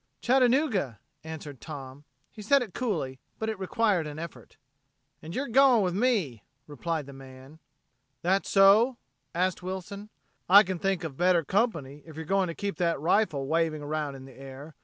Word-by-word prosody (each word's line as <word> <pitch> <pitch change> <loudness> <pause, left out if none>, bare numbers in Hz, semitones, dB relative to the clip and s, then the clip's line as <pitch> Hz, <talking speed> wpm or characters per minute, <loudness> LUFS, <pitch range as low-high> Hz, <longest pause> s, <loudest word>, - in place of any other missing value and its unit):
"Chattanooga," 250 - +2 0.3
answered 150 -5 -8
Tom. 140 0 -9 0.3
He 215 - -11
said 270 +6 +3
it 210 -7 -10
coolly 160 - -2 0.2
but 220 - -3
it 220 -3 -4
required 190 -3 +1
an 150 0 -7
effort. 170 +1 -9 0.6
"And 160 +3 -8
yer 280 +2 -2
going 255 -2 +5
with 180 -2 0
me," 195 - 0 0.2
replied 155 +1 -4
the 140 - -11
man. 135 +3 -13 0.6
"That 190 +3 +1
so?" 210 +6 +5 0.4
asked 180 +1 0
Wilson. 190 +3 -6 0.4
"I 200 +3 +9
can 185 -2 -4
think 195 -2 -1
of 145 -5 -6
better 175 -1 +3
company 160 - -1
if 160 -2 -13
you're 160 0 -6
going 195 +2 +1
to 165 - -5
keep 200 -1 -4
that 170 -4 0
rifle 165 -3 +1
waving 160 0 0
around 150 -1 -3
in 135 0 -11
the 135 - -13
air. 135 +4 -11
170 Hz, 170 wpm, -28 LUFS, 145-205 Hz, 0.6 s, I